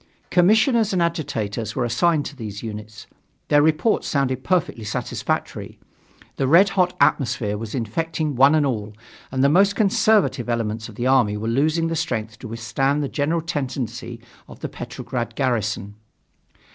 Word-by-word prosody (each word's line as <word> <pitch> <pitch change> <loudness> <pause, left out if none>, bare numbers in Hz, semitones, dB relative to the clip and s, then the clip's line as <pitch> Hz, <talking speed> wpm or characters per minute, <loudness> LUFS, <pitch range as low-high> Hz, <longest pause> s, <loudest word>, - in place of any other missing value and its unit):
Commissioners 215 +4 +4
and 185 - +1
agitators 115 - -3
were 125 - 0
assigned 145 +6 +1
to 145 - -7
these 105 -5 -7
units. 105 -1 -8 0.4
Their 145 0 +5
reports 155 +8 +2
sounded 130 -2 0
perfectly 170 -10 0
satisfactory: 105 - -3 0.6
the 135 - 0
red 175 +8 +6
hot 180 -2 +1
atmosphere 120 -7 +1
was 110 +2 -6
infecting 155 +5 -2
one 135 +5 +6
and 150 -2 +3
all, 110 -5 -3 0.4
and 130 0 0
the - - +6
most 195 +7 +4
conservative 195 - +2
elements 115 -1 -2
of 110 - -12
the 120 +2 -3
army 125 -6 +3
were 110 +2 -4
losing 155 +7 +1
the 165 - -2
strength 115 -9 -3
to 125 - -8
withstand 135 +6 -1
the 140 - -3
general 155 +3 0
tendency 125 -6 -4 0.3
of - - -13
the - - -4
Petrograd - - -5
garrison. 110 -6 -1
135 Hz, 155 wpm, -22 LUFS, 115-160 Hz, 0.6 s, red